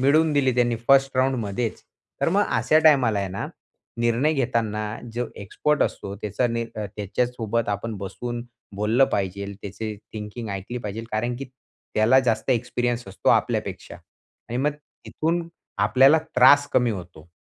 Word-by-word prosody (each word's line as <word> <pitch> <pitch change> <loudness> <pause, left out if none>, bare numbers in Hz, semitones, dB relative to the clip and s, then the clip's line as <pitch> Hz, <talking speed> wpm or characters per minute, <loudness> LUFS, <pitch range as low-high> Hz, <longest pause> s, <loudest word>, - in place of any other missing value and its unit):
मिळवून 155 +4 +4
दिली 135 -3 +2
त्यांनी 120 -1 +2
फर्स्ट 135 -1 +5
राउंडमध्येचं. 120 -4 -1 0.4
तर - - +2
मग 200 +4 +3
अशा 155 - +4
टाईमाला 130 -9 +5
आहे 100 - -2
ना 95 +2 -4 0.5
निर्णय 120 +6 +2
घेताना 115 -6 0 0.3
जो 120 +1 -2
एक्सपर्ट 150 +9 0
असतो 100 - -3
त्याचा 105 +4 -1
नि 115 0 -1
अ, 105 - -4
त्याच्यासोबत 115 +1 -1
आपण 105 +3 -2
बसून 120 +5 -5 0.3
बोललं 110 +6 +3
पाहिजेलं, 100 +1 -2
त्याची 105 +2 -5 0.2
थिंकिंग 110 +1 -6
ऐकली 100 +5 -5
पाहिजेलं 110 0 -6
कारण 120 +3 -1
की 135 - -5 0.5
त्याला 115 +5 +5
जास्त 125 0 0
एक्सपिरियन्स 120 -1 0
असतो 95 - -2
आपल्यापेक्षा - - -1 0.5
आणि 120 - -3
मग 145 +3 +2
तिथून 165 +3 -4 0.3
आपल्याला 135 +5 +5 0.2
त्रास 145 +3 +7
कमी 125 -2 +3
होतो. 90 -5 -8
120 Hz, 145 wpm, -24 LUFS, 105-130 Hz, 0.5 s, त्रास